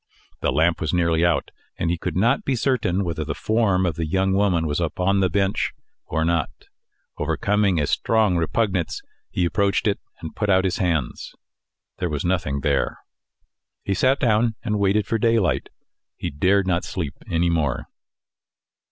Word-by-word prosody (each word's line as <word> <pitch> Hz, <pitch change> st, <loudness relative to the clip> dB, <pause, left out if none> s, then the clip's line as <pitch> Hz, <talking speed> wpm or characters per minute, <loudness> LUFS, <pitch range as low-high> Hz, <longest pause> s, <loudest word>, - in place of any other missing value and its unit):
The -, -, 0 dB
lamp 80 Hz, +6 st, +2 dB
was 80 Hz, +1 st, 0 dB
nearly 85 Hz, -1 st, +2 dB
out, 85 Hz, -1 st, +1 dB, 0.3 s
and 85 Hz, -, 0 dB
he 85 Hz, -, -1 dB
could -, -, -3 dB
not 120 Hz, +8 st, +2 dB
be 135 Hz, -, 0 dB
certain 110 Hz, -7 st, 0 dB
whether 85 Hz, -3 st, -3 dB
the 70 Hz, -1 st, -4 dB
form 105 Hz, -5 st, +1 dB
of 85 Hz, -4 st, -1 dB
the 80 Hz, -, -1 dB
young 95 Hz, +3 st, +1 dB
woman 95 Hz, -4 st, +2 dB
was 75 Hz, 0 st, -1 dB
upon 90 Hz, +4 st, +1 dB
the 95 Hz, -1 st, +2 dB
bench 95 Hz, +2 st, 0 dB, 0.3 s
or 80 Hz, +1 st, 0 dB
not. 85 Hz, -4 st, +1 dB, 0.7 s
Overcoming 100 Hz, -4 st, +1 dB
a 75 Hz, -, +2 dB
strong 110 Hz, +3 st, +2 dB
repugnance, 90 Hz, +1 st, -1 dB, 0.3 s
he 90 Hz, -, 0 dB
approached 100 Hz, +4 st, +1 dB
it, 105 Hz, -2 st, +1 dB, 0.2 s
and 80 Hz, -, -8 dB
put 105 Hz, -2 st, -1 dB
out 95 Hz, 0 st, +4 dB
his 95 Hz, -1 st, 0 dB
hands 85 Hz, -, -2 dB, 0.6 s
there 90 Hz, -, -1 dB
was 75 Hz, 0 st, -3 dB
nothing 80 Hz, -6 st, 0 dB
there. 70 Hz, 0 st, 0 dB, 0.9 s
He 100 Hz, -, -1 dB
sat 130 Hz, +7 st, +2 dB
down 115 Hz, -2 st, +2 dB
and 105 Hz, -2 st, -1 dB
waited 100 Hz, +1 st, +2 dB
for 115 Hz, -, -1 dB
the 115 Hz, -, +2 dB
daylight: 115 Hz, -5 st, +1 dB, 0.5 s
he 85 Hz, -, -4 dB
dared 95 Hz, +7 st, +2 dB
not 90 Hz, -2 st, 0 dB
sleep 80 Hz, -7 st, -4 dB, 0.2 s
any 85 Hz, +1 st, +1 dB
more. 75 Hz, -3 st, 0 dB
90 Hz, 170 wpm, -23 LUFS, 80-100 Hz, 0.9 s, out